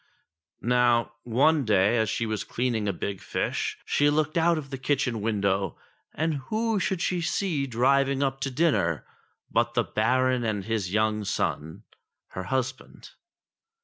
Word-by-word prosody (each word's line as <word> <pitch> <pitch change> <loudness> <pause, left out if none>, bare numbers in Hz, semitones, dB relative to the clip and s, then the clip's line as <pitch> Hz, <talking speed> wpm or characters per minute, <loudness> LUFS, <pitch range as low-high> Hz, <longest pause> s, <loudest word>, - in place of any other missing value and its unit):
Now 120 -1 +3
one 140 +6 +3
day 105 -1 +3
as 110 -1 +1
she 115 - -1
was 110 -1 -2
cleaning 115 -4 -1
a - - +2
big 100 +1 -5
fish, - - -2
she 145 0 +3
looked 155 +1 0
out 170 0 +3
of 140 -3 -6
the 135 - -5
kitchen 130 -5 0
window, 100 -3 0 0.4
and 160 -1 0
who 220 -1 0
should 185 -1 -1
she 180 -1 0
see 165 -5 -1
driving 135 +3 +2
up 135 -1 -1
to 135 - -2
dinner 130 - +1 0.5
but 120 +1 +1
the 120 - +3
Baron 125 +3 +1
and 105 -4 -2
his 105 -5 -2
young 110 0 +1
son, 80 -5 -2 0.5
her 95 - -6
husband. 130 0 -4
125 Hz, 150 wpm, -26 LUFS, 110-140 Hz, 0.5 s, Now